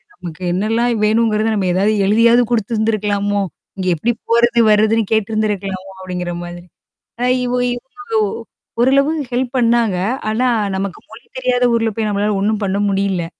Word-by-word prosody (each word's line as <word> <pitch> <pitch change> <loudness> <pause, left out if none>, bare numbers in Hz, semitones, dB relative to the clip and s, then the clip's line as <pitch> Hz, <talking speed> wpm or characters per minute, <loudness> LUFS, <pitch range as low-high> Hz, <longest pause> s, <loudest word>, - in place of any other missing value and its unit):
நமக்கு 175 0 -9
என்னலாம் 225 +3 0
வேணுங்கிறத 220 0 +2
நம்ம 195 -3 0
ஏதாவது 195 +4 +2
எழுதியாவது 230 +4 +4
குடுத்திருந்திருக்கலாமோ! 210 -2 0 0.4
இங்க 185 - -3
எப்படி 230 +10 0 0.2
போறது, 235 +1 +3
வருதுன்னு 215 +1 +3
கேட்டருந்திருக்கலாமோ 205 -3 -2
அப்படிங்கிற 180 -1 -4
மாதிரி. 175 0 -9 0.6
அ - - +2 0.2
இவ 245 - -2 0.2
இவங்க 265 +8 -12 0.3
ஓ - - -1 0.5
ஓரளவு 275 +4 +3 0.2
ஹெல்ப் 245 0 -1
பண்ணாங்க. 230 -5 +2 0.3
ஆனா 235 +4 +1 0.3
நமக்கு 195 -1 -4
மொழி 225 +2 -13
தெரியாத 250 -1 0
ஊர்ல 225 -1 +1
போய் 220 -1 -1
நம்மளால 205 +1 0
ஒண்ணும் 215 +1 0
பண்ண 195 0 -1
முடியல. 195 -3 0
215 Hz, 140 wpm, -17 LUFS, 195-235 Hz, 0.6 s, எழுதியாவது